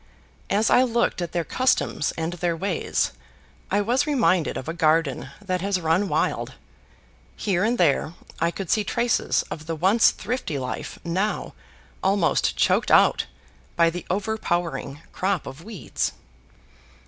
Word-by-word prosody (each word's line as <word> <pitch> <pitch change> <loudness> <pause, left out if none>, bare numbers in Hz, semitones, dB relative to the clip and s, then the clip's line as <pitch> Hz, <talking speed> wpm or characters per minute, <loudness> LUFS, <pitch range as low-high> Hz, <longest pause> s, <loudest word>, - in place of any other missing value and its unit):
As 215 +3 +2
I - - +6
looked 235 -6 +1
at 170 -1 -3
their 170 - -1
customs 255 - +1
and 165 +1 -2
their 175 -1 -1
ways, 190 0 -1 0.6
I 205 +2 +2
was 250 +8 +1
reminded 230 - +2
of 130 - -6
a 165 - -2
garden 155 -5 +1
that 185 -3 -2
has 195 -1 0
run 170 +4 +1
wild. - - 0 0.8
Here 190 -3 0
and 235 +3 +1
there 160 -1 +2 0.2
I 170 - +2
could 185 0 -5
see 215 - +3
traces 235 +4 +1
of 155 0 -6
the 165 - -2
once 190 +8 +5
thrifty 240 - -3
life 125 -1 -5
now 190 +5 -1 0.5
almost 190 -2 +2
choked - - +2
out - - +5 0.5
by 170 -1 +4
the 175 +1 -6
overpowering 175 -7 -2
crop 190 -3 -1
of 140 +5 -9
weeds. 215 -3 -3
180 Hz, 145 wpm, -24 LUFS, 165-210 Hz, 0.8 s, I